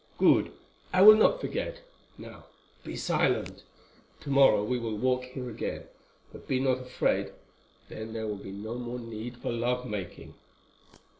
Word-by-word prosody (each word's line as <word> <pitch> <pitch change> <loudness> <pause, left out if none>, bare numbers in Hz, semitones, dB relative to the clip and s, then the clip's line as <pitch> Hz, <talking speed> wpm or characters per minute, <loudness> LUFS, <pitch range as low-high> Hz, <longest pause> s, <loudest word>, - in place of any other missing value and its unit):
"Good, - - +4 0.4
I 185 +1 +5
will 215 +1 +11
not 220 - +4
forget. - - -4 0.4
Now - - -12 0.4
be - - -7
silent. - - 0 0.6
Tomorrow 135 -7 +4
we 125 +4 -1
will 115 -2 -4
walk 125 +2 0
here 125 0 -7
again; 115 - -5 0.5
but - - -13
be 130 - 0
not 130 -1 +1
afraid, 125 0 -1 0.6
then 110 0 -8
there 110 0 -4
will 105 -2 -4
be 95 - -8
no 110 +5 -6
more 120 0 -5
need 115 0 -7
for - - -4
love 125 +2 -1
making." 105 -6 -7
125 Hz, 150 wpm, -28 LUFS, 110-130 Hz, 0.6 s, will